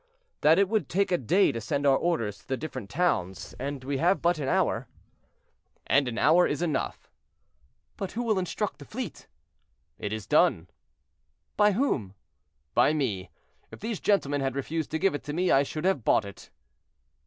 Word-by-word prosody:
"That 155 +2 +5
it 200 0 +4
would 210 -7 -1
take 195 +2 +1
a 180 - +3
day 180 - +3
to 115 - -5
send 145 +5 -2
our 135 -1 +5
orders 115 - -1
to - - -25
the 130 - -1
different 130 -9 -6
towns, 105 - -1
and 140 0 -4
we 135 0 -2
have 180 +4 +3
but 170 -1 +1
an 140 - -2
hour." - - +1 1.0
"And 140 -1 +3
an 120 -1 -4
hour 170 +4 +5
is 145 +3 -2
enough." 155 -5 -3 0.9
"But 195 -2 -5
who 240 - -2
will 215 -4 +1
instruct 190 +3 -3
the - - -10
fleet?" 235 - -7 0.7
"It 105 - -4
is 110 -2 -4
done." - - +2 0.8
"By 210 0 +4
whom?" 135 - -1 0.6
"By 150 - +4
me. 105 - -2 0.4
If - - -11
these 220 -1 -4
gentlemen 145 -9 +1
had 135 -1 -1
refused 155 +3 -3
to 160 - -1
give 195 +4 +2
it 145 - -3
to 145 - -4
me, 180 +3 +1
I 135 - +6
should 155 +4 -4
have 185 - +1
bought 105 - +3
it." 100 - -11
150 Hz, 185 wpm, -27 LUFS, 130-185 Hz, 1.0 s, I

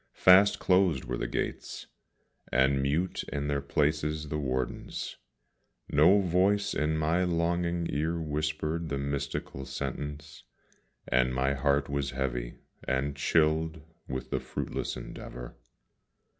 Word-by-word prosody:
Fast 95 +2 +6
closed 90 -7 +3
were 60 - -2
the - - -2
gates, - - -4 0.7
and 65 +1 +3
mute 75 +7 0
in 70 0 -2
their 70 -1 0
places 75 +1 0
the 75 - -2
wardens; 65 -3 -3 0.7
No 85 +8 +6
voice 95 +3 +2
in 75 +2 0
my 80 +4 +2
longing 85 0 0
ear 80 +4 -1
whispered 75 +1 -2
the 70 - -1
mystical 70 -1 -3
sentence, 75 +3 -5 0.7
And 65 0 +2
my 65 +2 +2
heart 70 0 +1
was 70 -1 -1
heavy, 60 -3 -2 0.3
and 70 +2 -1
chilled 80 +2 +2 0.3
with 65 0 -5
the - - +1
fruitless - - -4
endeavour. - - -8
75 Hz, 120 wpm, -29 LUFS, 70-85 Hz, 0.7 s, Fast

